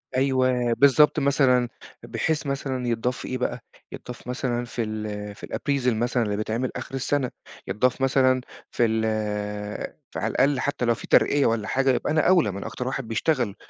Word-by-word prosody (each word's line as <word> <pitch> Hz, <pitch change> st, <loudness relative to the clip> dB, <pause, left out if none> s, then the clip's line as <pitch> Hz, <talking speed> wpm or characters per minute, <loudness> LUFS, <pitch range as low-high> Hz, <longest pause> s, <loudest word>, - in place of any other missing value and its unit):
أيوه، 130 Hz, -2 st, +2 dB
بالضبط 140 Hz, +3 st, +5 dB
مثلًا، 130 Hz, -3 st, +3 dB, 0.3 s
بحيث 160 Hz, -1 st, -1 dB
مثلًا 135 Hz, -2 st, -2 dB
يتضاف 120 Hz, +2 st, -1 dB
في -, -, -7 dB
إيه 130 Hz, -, -2 dB
بقى، 125 Hz, -, -2 dB, 0.3 s
يتضاف 125 Hz, 0 st, -9 dB
مثلًا 125 Hz, -1 st, -2 dB
في 120 Hz, 0 st, -3 dB
ال 105 Hz, -1 st, -5 dB
في -, -, -9 dB
الappraisal 135 Hz, -4 st, 0 dB
مثلًا 120 Hz, +2 st, 0 dB
اللي 105 Hz, -2 st, -2 dB
بيتعمل 115 Hz, +4 st, -2 dB
آخر -, -, -6 dB
السنة، 135 Hz, 0 st, 0 dB, 0.4 s
يتضاف 125 Hz, +4 st, +1 dB
مثلًا 130 Hz, -1 st, +3 dB, 0.3 s
في 120 Hz, -, +2 dB
ال 110 Hz, 0 st, +1 dB, 1.1 s
ف -, -, -6 dB
على -, -, -1 dB
الأقل 135 Hz, 0 st, +2 dB
حتّى 145 Hz, -3 st, -1 dB
لو 120 Hz, -, +3 dB
في -, -, -10 dB
ترقيّة 145 Hz, -1 st, +4 dB
والّا 115 Hz, -2 st, +1 dB
حاجه، 135 Hz, +3 st, +1 dB
يبقى 130 Hz, -, +1 dB
أنا 155 Hz, 0 st, +3 dB
أولى، 175 Hz, -, +4 dB
ما 95 Hz, -, -6 dB
أنا -, -, -5 dB
أكتر 125 Hz, -, -5 dB
واحد 130 Hz, -2 st, -3 dB
بيشتغل، 115 Hz, -2 st, 0 dB
125 Hz, 180 wpm, -25 LUFS, 115-135 Hz, 1.1 s, بالضبط